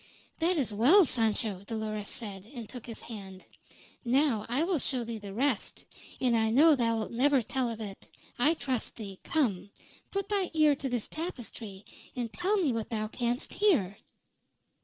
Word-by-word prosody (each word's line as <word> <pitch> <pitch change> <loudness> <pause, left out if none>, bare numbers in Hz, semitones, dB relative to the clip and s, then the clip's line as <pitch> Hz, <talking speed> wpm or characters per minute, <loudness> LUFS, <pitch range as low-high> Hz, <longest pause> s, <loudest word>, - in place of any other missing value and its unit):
"That 345 +2 +2
is 250 -8 0
well, 300 - +6
Sancho," 220 -6 +1
Dolores 215 -2 -3
said, 200 -5 -3
and 235 -3 -6
took 245 0 -9
his 230 - -5
hand. 195 -5 -9 0.6
"Now 250 -3 +2
I 260 +6 +2
will 345 -2 +1
show 255 -2 -1
thee 230 -1 -5
the 200 -1 -8
rest; 245 +2 -1 0.3
and 250 -2 +3
I 220 -1 +2
know 295 +7 +6
thou'lt 230 -4 0
never 265 +2 +3
tell 255 +2 -1
of 230 -1 -5
it. 200 -3 -7 0.3
I 300 +7 +4
trust 260 -6 -2
thee. 200 -4 -8
Come. 215 - 0 0.4
Put 395 0 -2
thy 395 -3 +1
ear 305 -2 +5
to 270 0 -4
this 245 -3 -2
tapestry, 230 - -6 0.3
and 240 -3 -3
tell 385 +4 +1
me 335 -9 +2
what 225 -1 -3
thou 215 -2 -2
canst 240 +1 -2
hear." 260 - +2
235 Hz, 170 wpm, -30 LUFS, 215-285 Hz, 0.6 s, well